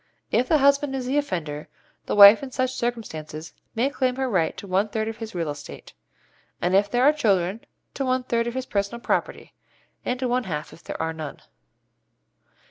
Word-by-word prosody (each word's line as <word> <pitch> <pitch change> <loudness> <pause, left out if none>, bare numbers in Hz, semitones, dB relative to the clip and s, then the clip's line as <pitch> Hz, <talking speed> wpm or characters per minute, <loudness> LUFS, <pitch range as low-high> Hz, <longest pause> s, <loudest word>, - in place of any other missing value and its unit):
If 250 - +2
the 315 - +5
husband 280 0 +3
is 260 -2 -3
the 270 +3 +1
offender, 160 - -4 0.4
the - - -1
wife 205 +1 +10
in 275 - -6
such 255 0 -1
circumstances 160 -10 -5 0.2
may 250 +5 +1
claim 255 -3 0
her 265 0 -1
right 185 -9 0
to - - -8
one 195 +3 +1
third 220 +1 -2
of 225 0 -5
his 225 -3 -7
real 165 -4 -1
estate; 145 0 -10 0.7
and 175 +1 0
if 200 +1 +3
there 245 +1 +1
are 295 +3 +6
children, 200 - +1 0.3
to 275 - -2
one 255 0 +1
third 235 -1 0
of 235 - -4
his 260 -1 -2
personal 200 +1 -2
property, - - -2 0.5
and 250 0 -2
to 255 - 0
one 245 0 0
half 150 -3 -5
if 165 - -16
there - - -6
are 160 0 -1
none. 155 -3 -7
225 Hz, 200 wpm, -24 LUFS, 180-255 Hz, 0.7 s, wife